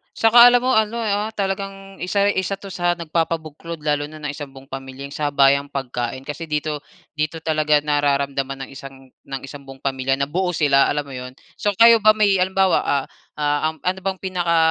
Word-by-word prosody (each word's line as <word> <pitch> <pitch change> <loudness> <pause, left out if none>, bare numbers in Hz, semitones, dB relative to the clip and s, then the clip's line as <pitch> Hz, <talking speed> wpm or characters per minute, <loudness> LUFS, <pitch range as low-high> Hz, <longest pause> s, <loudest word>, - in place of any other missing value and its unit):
saka 235 +2 +7
alam 245 0 +5
mo 255 - +2
ano 220 +2 +1
ah, 205 0 0
talagang 195 0 -4
isa 200 +3 +1
isa 190 +1 -1
'to 200 - -9
sa 175 -1 0
nagpapabuklod 165 -1 -3
lalo 145 -1 0
na 155 +1 -12
ng 145 - -2
isang 145 -2 -8
buong 135 +1 -14
pamilya 135 +1 -7
sabayang 140 -1 +2
pagkain. 125 -2 -4
Kasi 155 +3 -5
dito 150 0 -2 0.4
dito 155 +2 -2
talaga 155 -1 +2
nararamdaman 140 -2 -1
ng - - -18
isang 135 -1 -11
ng 135 -1 -8
isang 140 +1 -10
buong 135 0 -12
pamilya 135 -1 0
na 140 - 0
buo 180 +3 0
sila 140 -3 +4
alam 150 0 -1
mo 140 - -10
iyon? 125 0 -7 0.3
So 205 - +1
kayo 230 0 +8
ba 215 0 +7
may 205 -3 +3
halimbawa 190 0 +3
ah 140 -1 0 0.3
ah, 145 +1 +1
ano 185 +1 -1
bang 190 -1 -2
pinaka 175 -3 0
155 Hz, 190 wpm, -21 LUFS, 140-190 Hz, 0.4 s, kayo